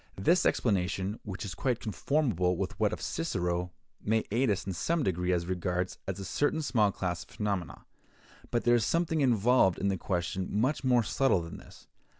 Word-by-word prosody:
This 170 - +3
explanation, 95 -1 0
which 100 0 -6
is 95 - -5
quite 125 +4 -1
conformable 105 - 0
with - - -3
that - - +2
of - - -5
Cicero, 90 +1 -2 0.3
may 110 +1 +1
aid 120 +3 +2
us 100 -2 0
in 95 - -3
some 165 - 0
degree 90 -2 0
as 85 -1 +1
regards 90 0 -2
a 95 - -2
certain 145 - 0
small 110 -7 +2
class 90 -3 -3
of - - -24
phenomena; 100 -7 -3 0.6
but 120 - 0
there 120 - +4
is 120 -2 +3
something 165 +2 +1
involved 120 -6 +4
in 100 - 0
the 95 - 0
question 90 0 -2
much 130 +9 0
more 125 -2 +4
subtle 110 -4 +2
than 85 - -8
this. - - -15
100 Hz, 180 wpm, -30 LUFS, 90-125 Hz, 0.6 s, there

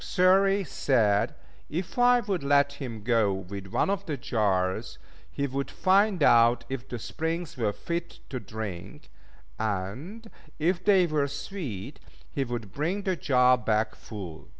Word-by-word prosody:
Xury 195 +2 +4
said 110 - +1 0.3
if 175 +9 -4
I 245 0 +5
would 200 -5 -2
let 140 0 +3
him 115 -6 -7
go 115 -3 +3
with 95 +1 -6
one 145 - +1
of 200 -1 -3
the 150 -3 -2
jars, 105 -2 0 0.3
he 140 +13 -2
would 140 0 -3
find 195 -2 +3
out 115 -1 +5
if 135 0 -5
the 120 - -4
springs 160 +7 -4
were 110 -4 0
fit 170 +9 -5
to 130 - -4
drink; 105 -5 -7 0.5
and, 110 - -4 0.3
if 175 +3 0
they 195 -3 +5
were 150 -3 0
sweet, 145 - -6 0.3
he 140 - -1
would 120 -6 -5
bring 175 +8 -1
the 190 -2 0
jar 125 -5 +4
back 110 -1 0
full. 95 -8 -9
135 Hz, 150 wpm, -27 LUFS, 110-175 Hz, 0.5 s, I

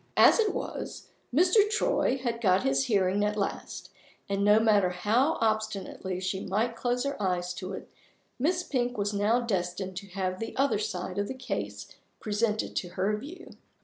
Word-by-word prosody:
As - - +7
it 435 -2 +3
was, - - -6 0.2
Mr. 365 - +4
Troy 435 - +1
had 235 -3 -3
got 190 -3 +3
his 135 0 +2
hearing 200 -1 +2
at 210 0 0
last; 200 - -4 0.4
and 200 0 0
no 210 +1 +6
matter 210 -4 +4
how 225 - +1
obstinately 215 -4 -1
she 185 +1 -2
might 220 +5 -1
close 245 +1 0
her 280 -5 -3
eyes 180 -2 0
to 185 +1 -6
it, - - -7 0.5
Miss 350 +7 +1
Pink 245 -5 -1
was 205 0 -1
now 210 +4 +2
destined 190 -3 -2
to 200 0 -6
have 185 -1 -3
the 225 - -5
other 270 -5 +2
side 185 -2 -3
of 205 - 0
the 260 - -5
case 100 - -4 0.3
presented 215 0 -1
to 180 - -2
her 195 +3 +1
view. 305 - -9
210 Hz, 175 wpm, -28 LUFS, 185-245 Hz, 0.5 s, As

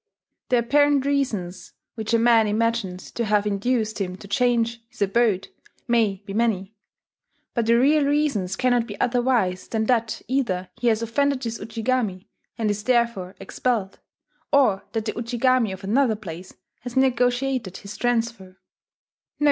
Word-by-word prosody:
The 250 - +4
apparent 285 +3 +3
reasons 220 -11 -2 0.2
which 220 -1 -4
a 230 - +4
man 230 -1 +4
imagines 215 -4 -1
to 235 - -2
have 210 -1 +2
induced 215 +1 -1
him 185 -1 -3
to 200 - -12
change 235 +2 +1
his 245 -4 -2
abode 200 -2 +1 0.4
may 215 -5 +1
be 195 - -6
many; 215 -3 0 0.8
but 235 -2 -1
the 235 0 +5
real 290 +4 +4
reasons 280 -11 0
cannot 245 -2 +1
be 205 -3 -8
otherwise 240 -7 +1
than 220 -1 -1
that 230 -2 0
either 195 -9 -1
he 245 - -2
has 225 0 +2
offended 275 +3 0
his 230 -1 -4
Ujigami, 225 -4 -2 0.3
and 220 -2 +1
is 205 0 -4
therefore 235 -7 +1
expelled, 220 -6 -2 0.5
or 255 -9 +3
that 225 -2 -2
the 215 - -2
Ujigami 240 -1 +1
of 190 +1 -8
another 230 +3 +2
place 185 -3 -9 0.2
has 245 +2 -7
negotiated 250 -4 +1
his 200 0 -9
transfer 230 -6 -2
230 Hz, 150 wpm, -24 LUFS, 200-245 Hz, 0.8 s, the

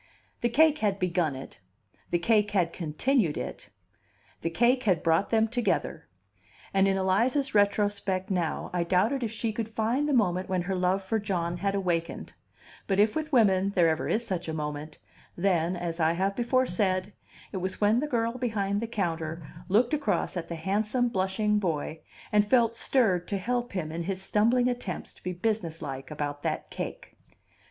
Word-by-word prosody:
The 240 - +2
cake 305 +5 +4
had 205 -2 +1
begun 175 -6 0
it, 135 0 -9 0.5
the 175 - +2
cake 210 +4 +2
had 180 -4 +1
continued 170 - 0
it, - - -6 0.7
the 165 - -1
cake 240 +9 +3
had 185 -9 +1
brought 165 +3 +2
them 225 -1 +3
together; 235 +1 -1 0.7
and 195 0 +4
in 195 0 +2
Eliza's 235 +9 +1
retrospect 205 -2 +1
now 175 -4 -1
I 175 -1 +1
doubted 190 +10 +1
If 230 -3 -2
she 225 -1 -2
could 225 0 -3
find 230 +7 0
the - - +1
moment 185 -5 +1
when 185 -2 0
her 190 +2 -2
love 185 +1 +1
for 220 +4 0
John 175 -4 -2
had 195 +2 -1
awakened; 175 -4 -2 0.5
but 195 -1 +1
if 210 +1 +4
with 315 0 -2
women 200 -6 +3
there 170 -2 +5
ever 160 0 -1
is 235 +2 0
such 180 -5 -3
a 160 - -3
moment, 150 0 -5 0.4
then, 175 -1 +1
as 175 -1 -4
I 160 0 +3
have 195 +3 0
before 250 +3 +2
said, 185 -1 0 0.4
it - - -4
was 185 0 -3
when 210 +3 +4
the 300 - -1
girl 235 -2 -1
behind 205 -4 -1
the 230 - -2
counter 165 -7 -3 0.2
looked 230 +8 +3
across 290 -8 0
at 170 -2 -4
the 170 - -3
handsome, 210 +8 0
blushing 210 +1 +1
boy, 160 -4 -2 0.3
and 210 0 +5
felt 230 +1 +3
stirred 205 -9 +2
to 200 - -1
help 240 +4 -2
him 165 -5 -3
in 165 +1 -4
his 190 0 -2
stumbling 230 +6 +2
attempts 245 -7 -4
to - - -21
be 180 - -2
businesslike 165 -9 -3
about 145 -1 -4
that - - -3
cake. - - -6
195 Hz, 180 wpm, -28 LUFS, 175-225 Hz, 0.7 s, there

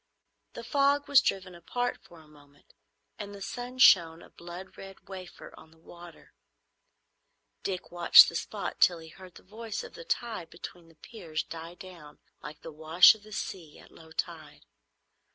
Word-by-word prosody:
The 235 - -8
fog 280 +3 +1
was 280 -2 +6
driven 185 -5 -2
apart 245 +9 -4
for 170 -2 -17
a 155 - -20
moment, 145 -1 -22 0.5
and 205 -1 -7
the 200 - -12
sun 245 +4 -7
shone, 170 -9 +5
a - - -17
blood 175 +2 -11
red 195 0 -13
wafer, 185 -2 -11
on 160 - -16
the 160 - -23
water. 170 +1 -15 1.3
Dick 185 -2 -5
watched 175 -1 +8
the - - -5
spot 205 +4 -5
till 175 - +5
he 160 -1 -12
heard 185 +1 -15
the - - -15
voice 215 +2 -7
of - - -11
the - - -10
tide 235 - -4
between 170 0 -11
the 165 - -21
piers 165 -5 -6
die 165 +1 -9
down 170 -6 -13 0.2
like 150 0 -10
the 165 - -8
wash 160 +3 +6
of 220 - -16
the 215 +1 -16
sea 170 -6 -7
at - - -17
low 160 -1 -17
tide. 160 -1 -6
175 Hz, 175 wpm, -28 LUFS, 165-210 Hz, 1.3 s, watched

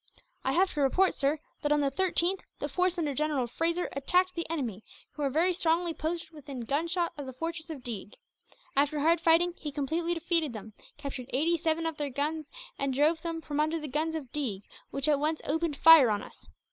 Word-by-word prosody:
"I 265 - +1
have 375 +4 +3
to 295 - -1
report, 365 +8 +3
sir, 285 +2 +1 0.2
that 295 - 0
on 295 0 +4
the 280 -1 +1
13th 365 +3 +1 0.2
the - - -3
force 365 0 +1
under 305 -4 -1
General 295 -2 0
Fraser 335 +8 -1
attacked 360 +7 +2
the 335 -2 -4
enemy, 240 - -3 0.3
who 300 - -8
were 280 - +2
very 335 +7 +2
strongly 340 0 +1
posted 325 +1 -3
within 280 -5 -8
gunshot 335 +8 -1
of 280 - -5
the 260 - -6
fortress 330 +4 -5
of 290 -6 -7
Deeg. 210 -4 -6 0.6
After 290 +2 +2
hard 330 +2 +3
fighting 345 +1 +4
he 295 - -5
completely 320 +5 -1
defeated 330 -4 +1
them, 215 0 -8 0.2
captured 275 -4 -6
eighty 320 +6 +2
seven 325 0 0
of 325 -2 -2
their 290 -1 -2
guns, 295 +3 -2 0.3
and 275 -2 0
drove 310 +4 +3
them 330 -1 -4
from 295 -2 -4
under 310 +2 +1
the 305 - -5
guns 310 +4 -1
of 275 -6 -6
Deeg, 230 -10 -3 0.3
which 275 +1 -1
at 295 -2 +3
once 310 +2 0
opened 320 0 -1
fire 320 -6 +9
on 205 -1 0
us. - - -13
310 Hz, 210 wpm, -29 LUFS, 275-335 Hz, 0.6 s, fire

